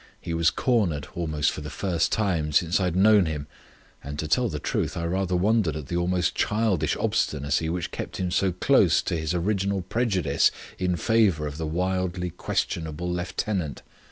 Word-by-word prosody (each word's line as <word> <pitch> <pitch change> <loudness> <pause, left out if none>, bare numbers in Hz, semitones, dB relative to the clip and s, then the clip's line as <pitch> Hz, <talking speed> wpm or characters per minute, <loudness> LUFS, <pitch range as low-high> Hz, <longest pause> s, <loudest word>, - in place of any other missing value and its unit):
He 85 - -5
was 85 0 +3
cornered 95 - 0
almost 80 -4 0
for - - -6
the 75 - -6
first 90 -3 -1
time 90 -8 0
since 85 +4 +3
I 95 - +1
had 90 -1 -1
known 100 -1 +5
him; 75 -2 -3 0.6
and 75 +1 -6
to 80 - -3
tell 120 +10 +2
the 75 - -4
truth - - -2
I 85 - -2
rather 90 +1 0
wondered 100 -3 +2
at 75 -3 -7
the - - -2
almost 90 0 +1
childish 105 -6 +1
obstinacy 75 +2 0
which 85 0 -3
kept - - -6
him 90 -1 -2
so 95 +1 +2
close 90 - +3
to - - -1
his 80 +1 -2
original 100 +1 0
prejudice 95 - +2 0.3
in 90 -1 +1
favour 100 -6 +2
of 75 +1 -6
the 80 - -2
wildly 90 +1 -1
questionable 85 0 -2
lieutenant. 90 -2 -3
90 Hz, 180 wpm, -25 LUFS, 80-95 Hz, 0.6 s, known